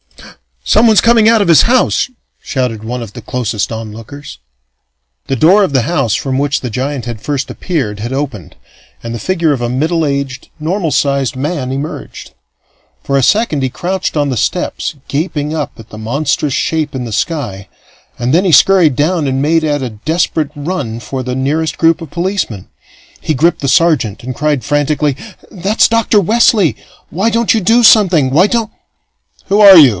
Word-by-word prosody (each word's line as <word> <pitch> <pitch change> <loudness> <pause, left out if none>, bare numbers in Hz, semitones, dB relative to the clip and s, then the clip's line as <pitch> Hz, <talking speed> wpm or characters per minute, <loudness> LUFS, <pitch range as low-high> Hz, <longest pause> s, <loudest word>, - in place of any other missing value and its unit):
"Someone's 220 -1 +4
coming 230 -2 +4
out 225 -1 +4
of 200 - 0
his 165 -3 +6
house!" 255 +2 +1 0.3
shouted 125 -5 -3
one 120 +2 -4
of 110 - -11
the 120 - -9
closest 115 -2 -3
onlookers. 115 - -9 0.9
The 135 - -1
door 180 - +4
of 185 - -1
the 130 -3 +2
house 135 -6 0
from 130 -1 -2
which 145 +1 0
the 125 - -4
giant 130 +2 -3
had 120 -3 -6
first 140 +2 -3
appeared 130 - -3
had 120 +5 -4
opened, 135 - -5 0.5
and 115 0 -5
the 115 - -5
figure 170 -1 0
of 130 - -4
a 120 - -1
middle 160 +6 0
aged, 140 -2 -3
normal 165 +1 -2
sized 140 -2 0
man 135 -1 -3
emerged. 140 +3 -6 0.7
For 140 - 0
a - - +2
second 205 - +1
he 130 - 0
crouched 185 +8 -3
on 145 -2 0
the 130 - -2
steps, 160 - -2
gaping 150 0 -2
up 155 -2 -3
at 115 -1 -14
the 110 - -10
monstrous 140 +5 -1
shape 155 -1 -1
in 130 - -3
the 115 - -6
sky, 115 - -3 0.5
and 125 +3 -1
then 180 +4 +3
he 180 - +2
scurried 175 -3 +5
down 155 +1 0
and 135 0 -1
made 160 +3 +1
at 145 -3 -1
a 125 - -3 0.2
desperate 160 -2 0
run 145 -7 -4
for 130 +2 -5
the 125 0 -4
nearest 150 +4 -1
group 165 +1 +2
of 165 - -8
policemen. 170 - -3 0.5
He 155 - -2
gripped 165 +5 +1
the 140 - -2
sergeant 135 -8 +1
and 130 +1 -5
cried 145 -1 -1
frantically: 145 +1 0 0.3
"That's 195 +3 +1
Dr. 230 -2 +2
Wesley! 205 - +3 0.3
Why 195 +7 0
don't 230 0 +1
you 225 - 0
do 230 +6 +3
something? 185 - +5
Why 170 +8 +4
don't 230 -1 -1 0.4
" - - -36
"Who 200 +1 +2
are 200 -3 +9
you?" 145 -5 +8
145 Hz, 185 wpm, -13 LUFS, 130-175 Hz, 0.9 s, are